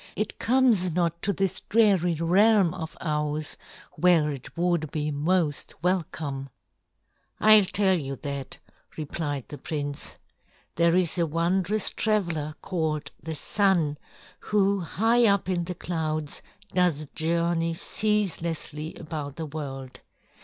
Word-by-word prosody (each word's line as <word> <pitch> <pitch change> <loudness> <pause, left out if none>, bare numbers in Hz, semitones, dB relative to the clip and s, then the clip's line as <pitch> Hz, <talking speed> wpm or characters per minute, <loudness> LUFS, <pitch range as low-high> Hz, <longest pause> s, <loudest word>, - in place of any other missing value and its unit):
It 215 - -3
comes 235 -7 +3
not 170 -1 0
to 200 - 0
this 195 -1 -1
dreary 195 -6 +3
realm 185 +3 +4
of 160 0 -7
ours, 150 -1 -2 0.4
where 170 -4 +3
it 140 +3 -9
would 170 -3 +1
be 150 0 -2
most 150 +1 0
welcome." 155 -6 -2 0.9
"I'll 215 -2 +8
tell 190 0 +2
you 135 -2 -4
that," 140 -2 -5 0.4
replied 145 -3 -4
the 145 - -8
prince. 145 -2 -4 0.6
"There 170 +1 +3
is 180 -1 +1
a 170 - +2
wondrous 180 +6 +1
traveler 170 -9 -1
called 160 -4 -2
the 160 -1 -5
Sun 175 -5 +1 0.4
who 200 -1 +1
high 225 +7 +2
up 200 -2 +2
in 175 -2 0
the 180 +1 -5
clouds 155 -3 -3 0.3
does 175 -5 +2
journey 165 0 0
ceaselessly 170 -7 0
about 150 -3 -6
the 165 - -4
world. 135 -4 -7
170 Hz, 125 wpm, -26 LUFS, 150-190 Hz, 0.9 s, I'll